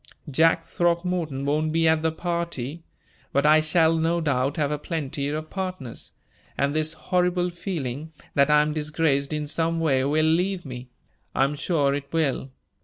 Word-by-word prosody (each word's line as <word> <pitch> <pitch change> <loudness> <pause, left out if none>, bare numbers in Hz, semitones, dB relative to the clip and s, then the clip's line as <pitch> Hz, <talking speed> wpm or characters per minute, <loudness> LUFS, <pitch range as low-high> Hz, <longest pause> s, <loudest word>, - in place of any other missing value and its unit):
Jack 165 +4 +4
Throckmorton 170 -5 -1
won't 155 +2 +1
be 165 0 +2
at 160 -1 +3
the 160 0 +1
party, 170 -4 -3 0.5
but 140 +1 +2
I 155 +1 +6
shall 160 +1 +3
no 165 +1 +1
doubt 140 -3 0
have 150 -2 0
a 150 - -2
plenty 145 -3 -3
of 155 +1 -4
partners, 185 -11 -5 0.5
and 140 +1 +1
this 155 +1 0
horrible 180 0 0
feeling 160 -5 -4 0.2
that 140 0 +4
I 150 0 +6
am 150 0 -2
disgraced 150 -2 0
in 150 -1 -2
some 165 +2 0
way 135 -5 +2
will 155 +2 +2
leave 180 +3 +1
me; 125 -1 -8 0.5
I - - +4
am 140 +2 +1
sure 145 -2 +1
it 140 0 -5
will. 150 -4 0
155 Hz, 170 wpm, -25 LUFS, 140-165 Hz, 0.5 s, I